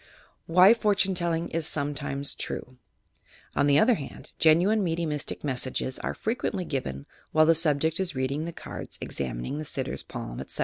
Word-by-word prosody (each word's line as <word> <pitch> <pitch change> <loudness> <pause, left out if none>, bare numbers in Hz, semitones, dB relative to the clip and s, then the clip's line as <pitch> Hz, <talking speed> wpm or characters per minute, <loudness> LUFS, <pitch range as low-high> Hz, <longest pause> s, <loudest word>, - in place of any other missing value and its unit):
WHY 180 +5 +7
POHTUNE 205 -4 +2
TELLINO 170 -2 0
IS 165 -1 0
ROMETIMES 145 -1 -2
TRDB 130 0 -5 0.8
On 145 - +3
the 140 0 +5
other 235 +10 +5
hand, 145 -11 -6
genuine 175 +7 +5
mediumistic 165 -4 -2
messages 130 -1 -1
are - - -3
frequently 215 -4 -2
given 70 - -4 0.3
while 155 0 +6
the 165 - +6
subject 160 0 +2
is 185 -5 -2
reading 135 +4 -1
the 170 - -4
cards, - - -7
examining 65 - -4
the - - -3
sitter's 130 - -2
palm, - - -7
etc. - - -6
155 Hz, 160 wpm, -27 LUFS, 140-175 Hz, 0.8 s, WHY